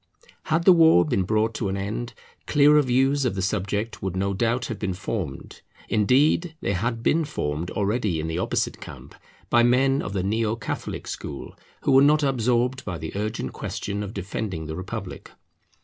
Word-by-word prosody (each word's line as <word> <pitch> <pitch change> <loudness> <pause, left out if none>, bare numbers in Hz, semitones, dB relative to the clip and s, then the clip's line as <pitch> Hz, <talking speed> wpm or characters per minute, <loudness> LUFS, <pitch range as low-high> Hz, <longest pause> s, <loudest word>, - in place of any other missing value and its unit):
Had 160 +2 +1
the 185 - +9
war 160 - +6
been 95 - 0
brought 110 +3 +1
to 110 -2 -2
an 95 - -2
end, 105 +5 -4 0.3
clearer 150 +1 +5
views 135 +2 +2
of 125 -6 0
the 95 - -2
subject 100 +3 -2
would 95 -1 -3
no 100 +1 0
doubt 120 +4 0
have 115 -3 -5
been 95 -4 -2
formed; 90 -7 -5 0.3
indeed 145 - +2
they 100 - -1
had 115 +5 -2
been 165 +4 +3
formed 80 - -3
already 105 -4 -1
in 80 - -3
the 80 +1 -2
opposite - - -1
camp, - - -11 0.4
by 120 - +5
men 135 +3 +3
of 95 - -5
the 95 -2 -1
Neo 110 +2 0
catholic 115 - -5
school, 70 - -7 0.3
who - - +1
were 135 0 +7
not 150 +2 +4
absorbed 125 -1 +1
by 90 -4 -4
the 80 +2 -7
urgent 105 +2 -3
question 100 0 -4
of 100 -1 -5
defending 95 -3 -4
the 80 0 -5
Republic. 95 +2 -7
110 Hz, 180 wpm, -24 LUFS, 95-130 Hz, 0.4 s, the